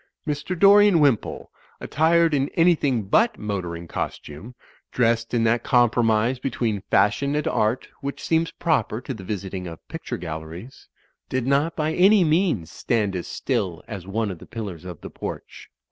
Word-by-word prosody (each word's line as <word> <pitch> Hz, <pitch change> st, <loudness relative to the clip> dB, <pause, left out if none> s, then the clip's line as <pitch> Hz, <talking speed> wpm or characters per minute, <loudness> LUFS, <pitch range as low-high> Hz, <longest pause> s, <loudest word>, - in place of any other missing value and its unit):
Mr. 150 Hz, +5 st, -3 dB
Dorian 200 Hz, -1 st, +6 dB
Wimpole, 140 Hz, -8 st, +1 dB, 0.3 s
attired 165 Hz, +1 st, +2 dB
in 140 Hz, -1 st, +1 dB
anything 150 Hz, -9 st, +3 dB
but 220 Hz, -, +2 dB
motoring 90 Hz, -5 st, -4 dB
costume, 85 Hz, +10 st, -6 dB, 0.4 s
dressed 115 Hz, -1 st, +1 dB
in 120 Hz, -2 st, +1 dB
that 115 Hz, +1 st, +2 dB
com 120 Hz, -3 st, +3 dB
promise 115 Hz, +2 st, +1 dB
between 115 Hz, -6 st, -2 dB
fashion 140 Hz, +7 st, +2 dB
and 150 Hz, -, -1 dB
art 110 Hz, +3 st, 0 dB
which 140 Hz, 0 st, -5 dB
seems 165 Hz, 0 st, +1 dB
proper 130 Hz, -, -1 dB
to 130 Hz, -, -6 dB
the 105 Hz, -5 st, -9 dB
visiting 95 Hz, -2 st, -5 dB
of 85 Hz, -1 st, -11 dB
picture -, -, -5 dB
galleries, 80 Hz, +7 st, -8 dB, 0.4 s
did 130 Hz, -2 st, -1 dB
not 140 Hz, +5 st, +1 dB
by 155 Hz, 0 st, -1 dB
any 195 Hz, +3 st, +5 dB
means 155 Hz, -, +1 dB
stand 105 Hz, -5 st, -1 dB
as 90 Hz, -, -4 dB
still 90 Hz, -3 st, -2 dB
as 95 Hz, -4 st, -7 dB
one 105 Hz, +1 st, -1 dB
of 90 Hz, -, -8 dB
the -, -, -13 dB
pillars 100 Hz, -7 st, -7 dB
of 90 Hz, -4 st, -8 dB
the -, -, -8 dB
porch. -, -, -8 dB
120 Hz, 160 wpm, -23 LUFS, 100-150 Hz, 0.4 s, Dorian